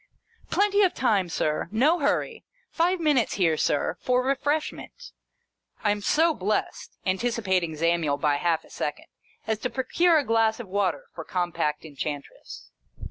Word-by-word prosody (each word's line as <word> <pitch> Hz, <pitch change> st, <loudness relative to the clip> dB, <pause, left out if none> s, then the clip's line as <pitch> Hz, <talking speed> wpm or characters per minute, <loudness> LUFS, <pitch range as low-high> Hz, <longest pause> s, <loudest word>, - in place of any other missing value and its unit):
" -, -, -32 dB
Plenty 410 Hz, 0 st, +3 dB
of 375 Hz, -3 st, +3 dB
time, 200 Hz, -8 st, +1 dB
Sir. 155 Hz, 0 st, -1 dB
No 290 Hz, +11 st, +3 dB
hurry. 285 Hz, -, -1 dB, 0.3 s
Five 350 Hz, +2 st, +1 dB
minutes 295 Hz, -7 st, +2 dB
here, 170 Hz, -5 st, +2 dB
Sir, 145 Hz, -, 0 dB
for 250 Hz, 0 st, +1 dB
refreshment." 290 Hz, -, -2 dB, 0.7 s
I 205 Hz, -, +3 dB
am 205 Hz, 0 st, -2 dB
so 320 Hz, +9 st, +3 dB
blest 210 Hz, -3 st, -3 dB
(anticipating 190 Hz, -5 st, 0 dB
Zamiel, 165 Hz, -2 st, +1 dB
by 145 Hz, 0 st, +1 dB
half 165 Hz, +1 st, 0 dB
a -, -, -19 dB
second) 150 Hz, -, -4 dB, 0.4 s
as 220 Hz, -1 st, -1 dB
to 250 Hz, -, -2 dB
procure 325 Hz, +7 st, +2 dB
a 295 Hz, -, +2 dB
glass 225 Hz, -1 st, +2 dB
of 240 Hz, -, -7 dB
water 200 Hz, -, -1 dB
for -, -, -7 dB
Compact 175 Hz, -4 st, -2 dB
Enchantress. 145 Hz, -, -7 dB
215 Hz, 150 wpm, -26 LUFS, -, 0.7 s, Plenty